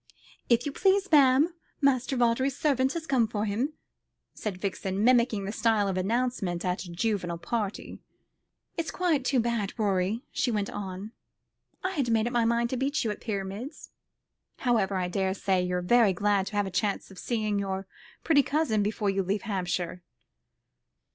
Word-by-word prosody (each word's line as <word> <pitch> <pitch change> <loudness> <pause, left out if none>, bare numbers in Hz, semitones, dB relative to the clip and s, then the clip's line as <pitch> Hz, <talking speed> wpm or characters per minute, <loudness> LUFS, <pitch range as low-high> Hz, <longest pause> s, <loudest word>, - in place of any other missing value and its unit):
"If 235 0 +3
you 290 - -2
please, 390 +4 +2
ma'am, 285 +2 +5 0.3
Master 270 -2 +2
Vawdrey's 245 +3 +2
servant 270 -3 +2
has 335 -2 -4
come 255 -6 +2
for 215 -1 -2
him," 235 +9 -1 0.6
said 205 -4 -4
Vixen, 195 0 -2
mimicking 235 -4 +3
the 200 - -3
style 220 -2 +2
of 190 - -1
announcement 195 -3 -1
at 180 +1 -1
a 175 - -9
juvenile 175 -2 -1
party. 210 +2 -4 0.8
"It's 330 -1 -2
quite 335 -7 +1
too 260 0 +2
bad, 230 -4 -1
Rorie," 205 +2 0
she 255 - 0
went 210 -3 -1
on, 195 +1 -6 0.7
"I 375 - 0
had 280 -10 -1
made 225 -1 +2
up 240 - -2
my 235 -1 +3
mind 235 +1 +1
to 260 - -1
beat 275 +3 0
you 220 - 0
at 210 - -7
pyramids. 210 - -5 0.7
However 220 -6 +1
I 180 -1 0
daresay 190 0 0
you're 180 0 -1
very 225 0 +4
glad 200 +1 +1
to - - -6
have 205 0 +2
the 190 - -5
chance 200 +2 -1
of 190 - -11
seeing 215 -4 -1
your 195 -1 -3 0.4
pretty 285 -3 +5
cousin 275 -6 +1
before 205 0 0
you 195 0 0
leave 195 +2 -1
Hampshire." 180 -3 -2
215 Hz, 170 wpm, -28 LUFS, 195-255 Hz, 0.8 s, ma'am